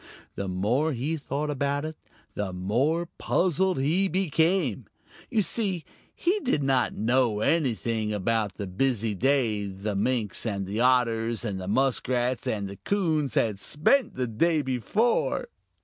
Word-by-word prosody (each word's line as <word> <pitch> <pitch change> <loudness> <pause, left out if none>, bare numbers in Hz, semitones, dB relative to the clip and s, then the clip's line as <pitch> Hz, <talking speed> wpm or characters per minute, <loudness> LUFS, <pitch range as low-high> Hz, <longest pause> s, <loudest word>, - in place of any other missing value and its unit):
The 100 - -4
more 115 +12 +1
he 135 +6 -2
thought 150 0 -3
about 140 +1 -1
it, 155 0 -5 0.4
the 105 -2 -3
more 125 - 0
puzzled 185 -1 +1
he 165 +8 +2
became. 165 - +1 0.4
You 215 - +2
see, 190 -6 -1 0.3
he 370 +5 +1
did 250 - 0
not 130 -3 +1
know 115 -1 +1
anything 115 - 0
about 105 -1 0
the 100 - -4
busy 110 +2 0
day 115 -3 +1
the 100 +2 -4
Minks 105 -1 0
and 100 -4 -2
the 100 +4 -3
Otters 115 -2 +2
and 100 -3 -3
the 90 - -6
Muskrats 125 +1 0
and 100 -2 -1
the 100 0 -8
Coons 160 - 0
had 105 -4 +1
spent 205 - +1
the 125 - -1
day 150 +7 +1
before. 170 - 0
125 Hz, 145 wpm, -27 LUFS, 105-155 Hz, 0.4 s, he